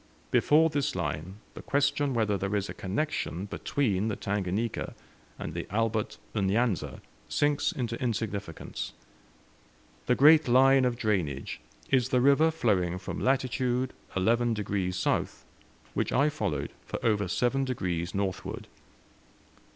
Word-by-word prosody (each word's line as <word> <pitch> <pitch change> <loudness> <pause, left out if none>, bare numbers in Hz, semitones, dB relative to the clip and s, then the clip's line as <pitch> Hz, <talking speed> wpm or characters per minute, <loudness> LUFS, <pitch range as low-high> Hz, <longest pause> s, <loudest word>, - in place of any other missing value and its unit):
Before 155 +2 +5
this 145 -1 -1
line 75 +6 -3 0.2
the - - -9
question 140 -1 +1
whether 110 -3 +2
there 100 +1 -2
is 100 -1 -1
a - - -4
connection 100 - -2
between 105 -1 -1
the 110 - -1
Tanganika 100 +3 -2 0.4
and - - -5
the - - -4
Albert 110 +1 -1 0.2
N'Yanza 105 +1 0 0.3
sinks 145 -1 +1
into 120 -3 -4
insignificance. 105 -7 -3 1.1
The 125 - +4
great 155 +3 +7
line 130 +2 +5
of 120 -1 0
drainage 90 - -1 0.3
is 130 -2 +3
the 130 -2 +3
river 140 +5 +5
flowing 100 - +1
from 90 - -5
latitude 130 -1 0 0.2
11 115 +4 +2
degrees 95 -3 -2
south, - - -1 0.5
which - - -1
I 140 +3 +3
followed 75 - -2
for - - -5
over 105 -4 +2
seven 125 +8 +1
degrees 90 -9 -2
northward. 95 -2 -3
115 Hz, 130 wpm, -29 LUFS, 95-130 Hz, 1.1 s, great